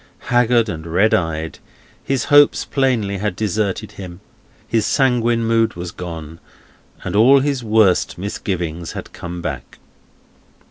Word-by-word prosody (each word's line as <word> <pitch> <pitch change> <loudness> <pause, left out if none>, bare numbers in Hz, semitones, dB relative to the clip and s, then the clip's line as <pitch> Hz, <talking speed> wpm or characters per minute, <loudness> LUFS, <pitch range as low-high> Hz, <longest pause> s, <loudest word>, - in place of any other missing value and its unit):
Haggard 120 -1 +3
and 80 -5 -6
red 95 +7 +2
eyed, 80 -2 -1 0.4
his 135 -2 -1
hopes 145 0 +6
plainly 120 -8 0
had 105 -2 -2
deserted 105 0 -2
him, 90 -3 -9 0.5
his 115 -2 +1
sanguine 120 -3 +1
mood 115 0 +1
was 90 0 -6
gone, 80 -2 -8 0.6
and - - -4
all 130 +6 +6
his 140 -3 -1
worst 105 -6 +2
misgivings 85 -4 -4
had - - -8
come 85 0 -7
back. - - -6
105 Hz, 130 wpm, -19 LUFS, 85-115 Hz, 0.6 s, hopes